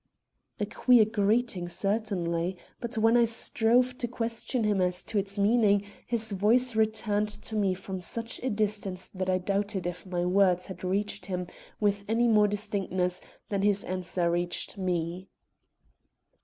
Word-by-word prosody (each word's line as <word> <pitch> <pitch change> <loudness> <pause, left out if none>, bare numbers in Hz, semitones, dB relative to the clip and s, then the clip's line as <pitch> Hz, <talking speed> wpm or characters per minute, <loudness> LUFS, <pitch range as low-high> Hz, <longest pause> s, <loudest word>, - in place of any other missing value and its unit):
A 205 - 0
queer 230 +2 +4
greeting, 210 -3 0
certainly. 185 -3 -1 0.2
But 235 0 -4
when 225 +2 +4
I 240 -1 +5
strove 240 +2 +2
to 240 - 0
question 230 +1 -1
him 205 -3 +1
as 180 0 +1
to 215 - -1
its 200 +1 -2
meaning, 205 -1 +3 0.2
his 225 -2 0
voice 225 +5 +2
returned 215 -1 +1
to 220 +1 -2
me 195 -3 +1
from 190 0 -6
such 230 +6 -2
a 260 - -1
distance 205 -4 -2
that 185 -1 -4
I 185 - +3
doubted 200 0 -1
if 175 0 -5
my 175 -1 -1
words 180 -1 +3
had 190 - -9
reached 195 0 -2
him 180 -2 -3 0.3
with 205 -1 +1
any 230 +2 +2
more 210 -2 +5
distinctness 195 -3 -1 0.3
than 200 -2 -1
his 205 0 +2
answer 180 -1 -1
reached 175 0 0
me. 180 -1 -3
205 Hz, 155 wpm, -28 LUFS, 185-220 Hz, 0.3 s, I